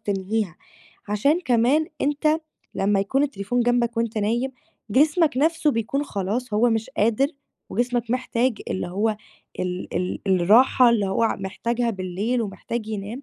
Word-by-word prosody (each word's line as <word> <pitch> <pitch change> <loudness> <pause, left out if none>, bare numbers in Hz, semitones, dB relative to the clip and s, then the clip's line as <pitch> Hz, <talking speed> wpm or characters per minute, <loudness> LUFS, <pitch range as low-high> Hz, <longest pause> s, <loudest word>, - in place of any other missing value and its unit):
تنهيها، 200 -3 -2 0.5
عشان 280 - +2
كمان 260 +3 +2 0.2
أنت 300 +2 +2 0.4
لمّا 200 0 +2
يكون 260 +8 +1
التليفون 245 -2 -2
جنبك 240 -1 +1
وأنت 230 -1 -1
نايم، 235 +5 0 0.4
جسمك 300 - +3
نَفْسه 320 +1 +2
بيكون 270 +4 -1
خلاص 210 +2 -3
هو 235 +3 +3
مش 225 +3 -1
قادر 230 +3 +2 0.4
وجسمك 240 +1 -1
محتاج 250 -2 0
اللي 185 - -2
هو 210 +4 0 0.4
ال 180 0 -4
ال 180 0 -2
الراحة 225 +7 +5
اللي 210 -4 +2
هو 195 +4 0
ع 225 - +2
محتاجها 230 +5 -2
بالليل 200 +5 -2
ومحتاج 215 +2 -5
ينام 215 +5 -5
230 Hz, 140 wpm, -23 LUFS, 205-255 Hz, 0.5 s, الراحة